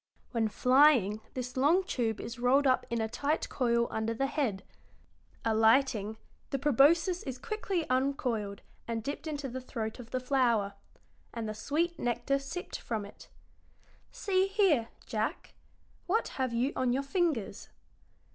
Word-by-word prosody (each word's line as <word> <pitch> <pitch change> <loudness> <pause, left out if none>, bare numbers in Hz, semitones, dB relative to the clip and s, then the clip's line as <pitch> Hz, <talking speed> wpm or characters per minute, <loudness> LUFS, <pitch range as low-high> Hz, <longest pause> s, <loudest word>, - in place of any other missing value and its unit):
When 230 -3 +1
flying 250 -3 +4
this 250 -1 -4
long 305 +9 +4
tube 235 - -1
is 235 +1 -6
rolled 265 +4 +4
up 255 -1 +2
in 235 - -1
a 220 - 0
tight 290 +7 -1
coil 235 -2 +1
under 220 +1 -1
the 270 - 0
head; 270 -9 -1 0.8
alighting, 220 -1 +3 0.3
the 275 - -1
proboscis 305 +7 +4
is 265 -3 -5
quickly 385 0 -3
uncoiled 250 -6 -1 0.2
and 230 -1 -2
dipped 285 +5 -5
into 290 -3 -3
the 260 +1 -5
throat 225 -2 -5
of 235 -2 -10
the 255 - -1
flower, 245 -6 +1 0.6
and 230 -2 -3
the 215 - -3
sweet 315 +10 -1
nectar 240 +3 0
sipped 320 +6 -6
from 220 -3 -3
it. 200 - -14 0.8
See 380 -1 +1
here, 385 - +3 0.2
Jack, - - -3 0.5
what 435 +6 +1
have 260 -2 -2
you 240 +4 0
on 255 -1 +1
your 270 +2 0
fingers?" 280 - -1
255 Hz, 145 wpm, -31 LUFS, 230-290 Hz, 0.8 s, flying